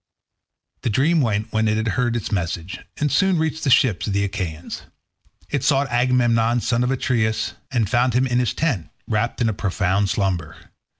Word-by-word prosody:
The - - -1
dream 150 +9 +2
went 110 -2 -1
when 110 0 +2
it 105 0 +1
had 110 0 0
heard 120 +1 0
its 115 - -3
message, 90 -2 -3 0.2
and 150 -2 0
soon 190 -2 +3
reached 160 0 -1
the 140 - +1
ships 125 -6 +3
of 100 - -1
the 100 0 +1
Achaeans. 90 -5 -4 0.7
It 140 -3 -1
sought 140 -1 +2
Agamemnon 120 -1 +2
son 120 +1 +1
of 125 - 0
Atreus 110 -4 0 0.2
and 115 -5 0
found 120 +3 +1
him 130 +1 +3
in 125 -1 +1
his 125 - 0
tent, 115 - -1 0.2
wrapped 115 +3 -1
in 115 - +3
a 110 - 0
profound 100 0 0
slumber. 95 -7 -1
115 Hz, 185 wpm, -22 LUFS, 100-125 Hz, 0.7 s, soon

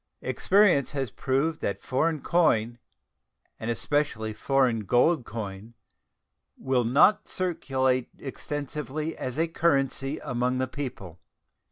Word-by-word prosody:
Experience 190 -9 +3
has 135 -5 -2
proved 140 +7 -1
that 100 - -2
foreign 155 +3 0
coin, 120 -10 +2 0.8
and 110 - -4
especially 120 -3 -1
foreign 130 -1 +1
gold 125 - +2
coin, 105 0 -7 0.8
will 130 -2 +1
not 140 - +4
circulate 130 -8 0
extensively 145 +2 -5
as 130 +1 -5
a 165 +1 +2
currency 140 -3 0
among 125 +1 -1
the 130 0 0
people. 120 - -7
135 Hz, 110 wpm, -27 LUFS, 120-150 Hz, 0.8 s, not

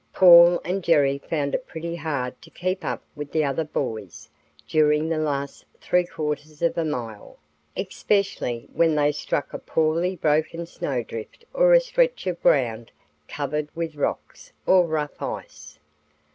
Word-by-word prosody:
Paul 175 -1 +8
and 185 +1 -2
Jerry 145 -5 +3
found 145 -2 -2
it 255 - -2
pretty 170 +1 -5
hard 140 -6 -4
to - - -15
keep 185 +1 -3
up - - -3
with 145 -1 -7
the 155 - +1
other 140 +3 0
boys 100 - -5 0.4
during 150 0 +3
the 165 -1 0
last 140 -2 -3 0.2
three 180 -1 +1
quarters 150 0 -5
of 170 - +2
a 165 - 0
mile, 115 -9 -5 0.4
especially 195 - -1
when 165 -2 +3
they 145 0 +3
struck 145 0 -3
a - - -4
poorly 165 +4 0
broken 160 +1 0
snowdrift 125 - -5
or - - +5
a - - +8
stretch - - 0
of 180 -2 -3
ground 115 -4 +2 0.4
covered 150 +1 -3
with 165 -1 -3
rocks 145 - -4
or 180 -2 +5
rough 150 -2 -3
ice. 75 0 -7
155 Hz, 150 wpm, -24 LUFS, 140-170 Hz, 0.4 s, Paul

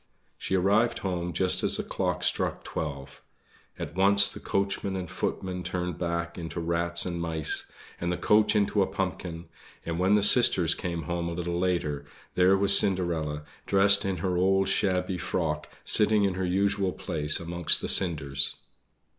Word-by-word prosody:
She 95 - -3
arrived 100 +6 +2
home 90 -2 -2
just 90 +1 +2
as - - +2
the - - -3
clock - - -3
struck - - -1
twelve. 70 -3 -6 0.6
At - - -6
once 100 +2 +4
the - - -8
coachman 100 0 -2
and 90 -1 -4
footmen 90 +2 -4
turned 90 -2 -4
back 85 0 -3
into 85 +1 -6
rats 85 +1 0
and 85 -2 -4
mice, 80 -3 -1 0.3
and 85 0 -2
the 90 - -2
coach 105 0 +2
into 105 0 +1
a 95 - +2
pumpkin; 90 -3 -5 0.4
and 85 0 -4
when 95 +3 +3
the 105 - +2
sisters 95 -7 +4
came 85 -2 -5
home 85 +2 -3
a - - -5
little 85 0 -3
later, 85 -6 -1 0.3
there 95 +2 +4
was 100 0 +6
Cinderella, 80 -6 -2 0.2
dressed 100 0 +3
in 95 -1 -2
her 90 -1 0
old 95 +1 +2
shabby 90 -1 0
frock, 75 -5 -3 0.2
sitting 105 0 +4
in 100 -2 +1
her 95 0 -3
usual 100 +1 0
place 75 -4 +1
amongst 85 0 +2
the - - -4
cinders. 70 -6 +2
90 Hz, 165 wpm, -27 LUFS, 85-95 Hz, 0.6 s, was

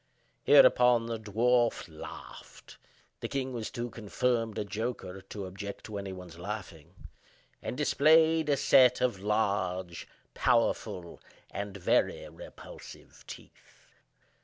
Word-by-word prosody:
Hereupon 125 -2 +6
the 115 -1 -4
dwarf 115 +3 +1
laughed 80 -2 -11 0.4
(the - - -4
king 130 -1 -3
was 115 -3 -4
too 120 -1 -5
confirmed 115 0 -1
a 105 - -2
joker 105 -3 -5
to 95 +1 -7
object 100 +2 -7
to 105 -2 -6
any 100 -1 -6
one's 90 -3 -10
laughing), 90 -5 -7 0.7
and 125 - -5
displayed 160 +2 +4
a 140 - +3
set 125 -2 +5
of 125 -6 0
large, 95 -4 -1 0.3
powerful, 105 -7 0 0.3
and 100 +1 -5
very 90 - +1
repulsive - - -13
teeth. - - -14
110 Hz, 115 wpm, -30 LUFS, 95-125 Hz, 0.7 s, Hereupon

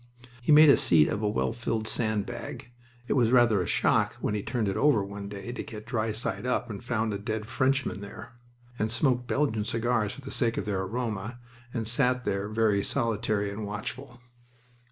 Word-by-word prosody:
He 120 - +1
made 150 0 +9
a - - +6
seat 80 -3 +5
of 105 - -2
a 105 - +1
well 110 +1 0
filled 115 -2 -2
sand 110 -3 -1
bag 120 - -7 0.4
(it - - +1
was 120 -5 +3
rather 120 -6 +5
a 90 - -3
shock - - +2
when - - -2
he 105 - -1
turned 115 0 -1
it 95 - -1
over 140 -8 +3
one 100 0 -7
day 100 +3 -6
to 125 - -5
get 105 -2 -9
dry 110 -1 -1
side 110 -2 -3
up 125 -1 -1
and 105 +2 -7
found 115 -3 -1
a 100 - -3
dead 110 0 -3
Frenchman 130 -2 0
there), 100 +3 -9 0.5
and 110 +1 0
smoked 125 -1 +1
Belgian 115 -7 0
cigars 115 -1 0
for 140 - -10
the 135 - -8
sake 120 -2 0
of - - -2
their 100 -3 -1
aroma, 110 +1 -3 0.3
and 115 -3 -3
sat 125 +1 +1
there 100 +1 -1
very 110 -2 +2
solitary 110 -3 0
and 105 +2 -5
watchful. 120 +5 -6
110 Hz, 200 wpm, -28 LUFS, 105-120 Hz, 0.5 s, made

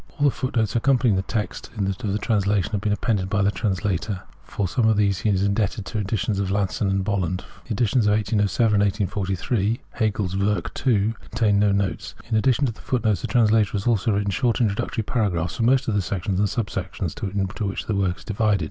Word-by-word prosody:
All 145 - +2
the 140 - +5
footnotes 120 -6 -1
accompanying 120 -2 +3
the 95 - +1
text 105 +2 -4
of 100 - 0
the 100 +1 -2
trans 105 -3 0
lation 100 0 +1
have 105 -3 -1
been 105 - 0
appended 100 -2 0
by 100 +1 +1
the 100 - +3
translator. 95 -1 -2 0.2
For 100 - -3
sojTie 110 +5 +2
of 110 - +2
these 100 -3 +2
he 110 - 0
is 95 -1 +2
indebted 100 0 0
to - - -8
the 110 - 0
editions 105 0 -1
of 100 -2 -1
Lasson 100 0 0
and 95 0 +1
Bolland. 95 -3 -1 0.2
The 120 - -2
editions 115 +1 +2
of 105 - +4
1807 105 +1 +1
and 100 - +4
of 100 -2 +1 0.2
1843 100 +4 0
(Hegel's 105 -4 -1
Werke 100 -2 0 0.2
II) 110 -2 +3 0.2
contain 105 -3 +2
no 105 0 +3
notes. 100 -4 -2
In 115 - -1
addition 130 +5 +3
to 125 - 0
the 110 - -14
fo(3t 125 -3 -1
notes 105 -5 +2
the - - -3
translator 110 -3 +3
has 100 -2 -2
also 115 -2 +2
written 100 0 0
short 120 +3 +1
introductory 110 0 0
paragraphs 90 -7 -1
for - - -2
most 125 +3 +3
of 110 - +1
the 100 - +2
sections 95 0 -2
and 100 0 +2
sub 110 -2 -2
sections 90 -2 -4
into 100 +2 -2
which 95 - -4
the 110 - -1
work 95 -2 0
is - - -14
divided. 105 -1 +1
105 Hz, 230 wpm, -23 LUFS, 95-110 Hz, 0.2 s, the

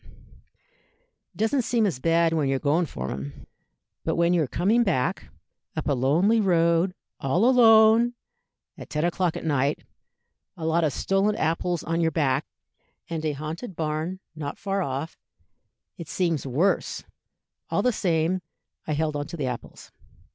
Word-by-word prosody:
It - - -19
doesn't 225 +5 +1
seem 235 -2 +1
as 175 -11 -1
bad 165 +2 +2
when 150 -4 +1
you're 135 - +1
going 155 +5 +1
for 65 - -5
'em; 70 +2 -7 0.6
but - - -1
when 170 +1 +3
you're 165 -5 +2
coming 210 - +2
back, 160 - 0 0.5
up - - -3
a 145 - +2
lonely 160 - +3
road, 170 -1 +2 0.2
all 165 - +1
alone, 230 -1 +6 0.6
at - - -10
ten 150 +2 -1
o'clock 175 -1 0
at - - -7
night, 145 -1 0 0.7
a 160 - -5
lot 165 +1 +2
of 155 - +2
stolen 195 +7 +1
apples 165 0 -1
on 165 +1 -1
your 165 - +3
back, 145 -3 0 0.6
and 160 -1 -3
a 155 -1 0
haunted 160 - -6
barn 160 +4 -3 0.2
not 145 -2 -5
far 195 -1 -2
off, 140 0 -4 0.8
it 170 - -8
seems 165 -6 -1
worse. 160 +10 0 0.7
"All - - 0
the 250 - +2
same, 175 -1 0 0.5
I 155 - 0
held 155 0 -1
on 145 0 -3
to 170 - -7
the 145 - -2
apples. 125 -2 -7
165 Hz, 155 wpm, -25 LUFS, 150-190 Hz, 0.8 s, alone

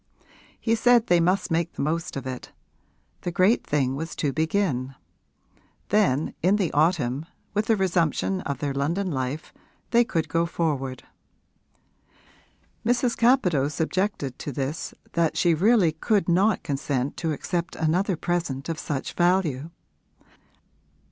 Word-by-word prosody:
He 225 - +1
said 235 0 +4
they 175 -1 +4
must 180 +2 +1
make 165 0 0
the - - -5
most 165 +2 -2
of 135 - -5
it; 130 -1 -6 0.7
the - - -2
great 190 +6 +3
thing 135 -3 0
was 160 +4 -5
to 145 -3 -1
begin; 155 -5 0 0.9
then 185 -9 +2
in 185 +4 +4
the 195 -6 0
autumn, 150 -2 +1 0.3
with 210 +2 0
the 225 - +4
resumption 185 0 0
of 140 -5 -3
their 140 +1 -2
London 170 +8 -1
life, 130 +2 -3 0.4
they 235 0 +5
could 170 -9 -1
go 165 0 +1
forward. 140 -7 -2 1.8
Mrs. 245 +1 +1
Capadose 180 - +2
objected 160 -6 -1
to 145 - -4
this 140 +3 -4 0.2
that 170 -2 +1
she 170 -2 +4
really 190 0 +4
could 190 +4 0
not 190 +5 +3
consent 140 -3 -2
to 165 -2 -1
accept 170 +3 -3
another 175 +3 +1
present 165 -5 -2
of 165 - -3
such 140 -3 -4
value. 175 -5 +1
165 Hz, 135 wpm, -25 LUFS, 145-190 Hz, 1.8 s, they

